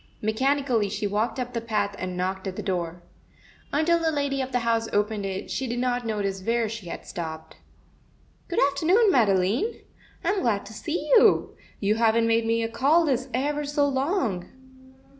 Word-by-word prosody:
Mechanically 245 0 +1
she 205 - -3
walked 210 +5 -1
up 250 0 -4
the 230 - -2
path 210 -3 -1
and 185 -1 -4
knocked 190 +2 -2
at 185 - -4
the 210 - -5
door. 175 -3 -3 0.7
Until 325 +4 +2
the 325 -1 +1
lady 285 -2 -1
of 260 0 -4
the 245 -1 0
house 230 -1 +1
opened 205 -1 0
it, 190 0 -5
she 265 - -2
did 240 +1 -3
not 245 -1 -1
notice 200 -3 -2
where 230 +3 +1
she 215 -4 -7
had - - -7
stopped. 160 -2 -7 0.9
Good 345 - -4
afternoon, 370 +10 +3
Madeline. 220 - +2 0.4
I'm 385 +3 +1
glad 210 -5 0
to 215 - -10
see 305 +7 -3
you. 450 - +4 0.2
You 205 +1 +2
haven't 230 0 +3
made 230 0 +2
me 230 0 +1
a - - 0
call 285 +9 +3
this 260 -2 0
ever 290 +4 -1
so 290 0 +1
long." 265 - -1
230 Hz, 180 wpm, -25 LUFS, 205-280 Hz, 0.9 s, you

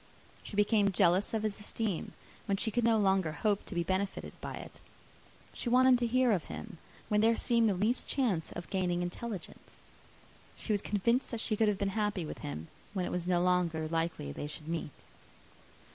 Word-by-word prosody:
She - - -9
became 205 -1 +3
jealous 185 +1 +3
of 220 -1 -1
his 215 -1 -2
esteem, 210 -3 -3 0.3
when 195 - +1
she 220 +2 +2
could 240 +2 +1
no 230 -1 +4
longer 190 -6 +2
hope 205 +6 0
to - - -6
be 170 - +1
benefited 190 +3 -2
by - - -5
it. - - -10 0.7
She 240 - -3
wanted 255 0 +6
to 240 - +1
hear 255 +1 +3
of 185 -7 +1
him, 200 -7 -8 0.3
when 210 0 +2
there 225 +1 +4
seemed 235 -2 +3
the 195 - +1
least 215 +7 +1
chance 210 - 0
of 175 - -7
gaining 180 -2 0
intelligence. 195 +2 -7 0.8
She 220 - -2
was 205 - +1
convinced 235 +6 +1
that 230 - -4
she 220 0 +1
could 220 +1 +3
have 210 -2 +2
been 200 0 0
happy 205 -3 -1
with - - -7
him, 75 +3 -6 0.3
when 185 -2 0
it - - -4
was 180 -1 -2
no 175 -1 +2
longer 175 -3 +1
likely 165 - -2
they 145 - -5
should 150 +1 -7
meet. 165 -4 -5
200 Hz, 195 wpm, -32 LUFS, 175-220 Hz, 0.8 s, wanted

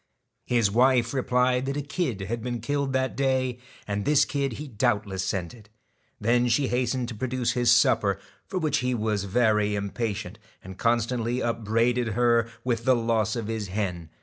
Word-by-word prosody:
His 115 -5 +2
wife 120 +1 +3
replied 125 0 +1
that 140 +1 -2
a 145 - -2
kid 140 - -2
had 115 +4 -3
been 120 0 -3
killed 140 +4 -1
that 130 0 0
day, 130 -2 0 0.3
and 100 0 -2
this 150 +3 +4
kid 140 -3 -2
he 150 +6 -7
doubtless 100 -4 -1
scented. 95 +3 -4 0.5
Then 120 +3 +2
she 125 +3 +2
hastened 125 0 0
to - - -5
produce 125 +2 -1
his 120 -1 +1
supper, 105 -5 +4 0.3
for 190 - -4
which 155 -4 +1
he 125 0 0
was 105 -3 -1
very 105 -1 +2
impatient, 100 0 -3 0.2
and 95 0 -10
constantly 120 +1 0
up 115 -1 -2
braided 115 +1 +1
her 115 0 +2
with 120 -2 -1
the 130 +1 +4
loss 115 -1 0
of 115 -2 -3
his 110 -1 -3
hen. 90 -4 -3
120 Hz, 175 wpm, -26 LUFS, 105-125 Hz, 0.5 s, this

